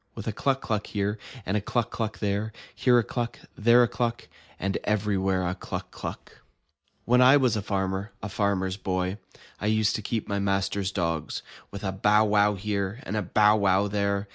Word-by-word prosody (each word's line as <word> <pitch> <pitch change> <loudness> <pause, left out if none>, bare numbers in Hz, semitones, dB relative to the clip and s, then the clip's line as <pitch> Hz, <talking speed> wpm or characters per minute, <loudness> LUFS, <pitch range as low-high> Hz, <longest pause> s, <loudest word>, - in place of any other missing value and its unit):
With - - -7
a - - -1
cluck 135 +4 0
cluck 105 -2 -2
here, 105 +1 -2 0.3
and 95 - -1
a 105 - +1
cluck 115 +3 -1
cluck 110 -2 -3
there. 105 +1 -1 0.2
Here 125 -2 +4
a 120 - +4
cluck, 120 +1 -3 0.2
and 105 - -12
there 120 +1 +8
a - - +3
cluck. 120 0 -2 0.3
And 95 0 -1
everywhere 95 -3 +1
a 90 - 0
cluck - - -6
cluck! - - -8 0.6
When 125 +1 +4
I 130 +3 +8
was 130 -5 +2
a 105 - -1
farmer, 95 +1 -2
a 100 - -5
Farmer's 95 -2 0
Boy, 95 +1 -2 0.4
I 105 - -2
used 110 0 +2
to - - -5
keep 110 +1 -3
my 100 0 -1
master's 95 0 0
dogs. 85 -5 -2 0.3
With 100 +1 -8
a 95 - -1
bow 105 +3 +3
wow 105 0 +3
here, 100 +2 -2
and 105 - -4
a 105 - +1
bow 105 +3 +4
wow 100 0 +3
there. 100 0 -1
105 Hz, 195 wpm, -27 LUFS, 95-110 Hz, 0.6 s, there